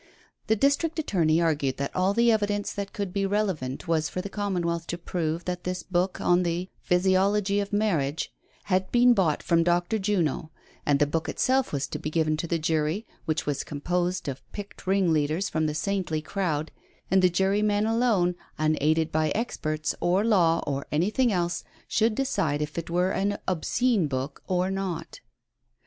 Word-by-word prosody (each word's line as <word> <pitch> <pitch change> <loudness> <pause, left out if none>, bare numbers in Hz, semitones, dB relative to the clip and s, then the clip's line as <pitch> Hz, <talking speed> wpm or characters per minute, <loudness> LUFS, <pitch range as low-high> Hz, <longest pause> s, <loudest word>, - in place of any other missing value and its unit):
The 220 - +3
district 285 +8 +1
attorney 170 - +2
argued 150 -5 +1
that 140 0 -3
all 185 +2 +2
the 235 0 +5
evidence 205 -2 0
that 200 -1 -4
could 200 -3 -4
be 200 - 0
relevant 190 -9 -1
was 160 -2 +1
for - - -4
the 200 +2 -5
Commonwealth 175 -5 -2
to 175 - -3
prove 170 -1 -3
that 180 -1 -3
this 180 -1 -3
book 180 +1 -1
on 175 +1 +3
the 175 +1 -2
''Physiology 195 +2 +2
of 200 - -5
Marriage" 165 -9 0 0.3
had 185 -1 0
been 245 0 +6
bought 175 -9 +1
from 170 0 +3
Dr. 175 +5 +1
Juno, 180 -6 0 0.4
and 145 -1 +4
the 145 - +3
book 160 +3 -2
itself 260 0 +1
was 140 -1 -1
to - - -5
be - - -3
given 155 -1 +1
to 170 - -3
the 170 - 0
jury— 160 +5 0 0.2
which 160 -1 -1
was 145 -1 -1
composed 175 +4 -2
of 135 -1 -4
picked 205 -2 -9
ringleaders 170 -2 +2
from 155 0 0
the 150 - -2
saintly 185 -3 -1
crowd— 160 -5 -2 0.4
and 190 0 +5
the 185 - +5
jurymen 205 +3 +2
alone, 220 -6 +2 0.2
unaided 155 +1 +1
by 155 0 +1
experts, 155 -9 -2
or 180 +3 +2
law, 175 -7 +3
or 140 -1 -3
anything 210 - +2
else, 175 -2 -1 0.2
should 220 0 +2
decide 160 - 0
if 150 0 -4
it 170 0 -4
were 180 +2 +1
an 200 +1 0
obscene 190 +2 +1
book 135 +1 -4
or 185 0 +1
not. 185 -4 -4
180 Hz, 175 wpm, -26 LUFS, 155-200 Hz, 0.4 s, been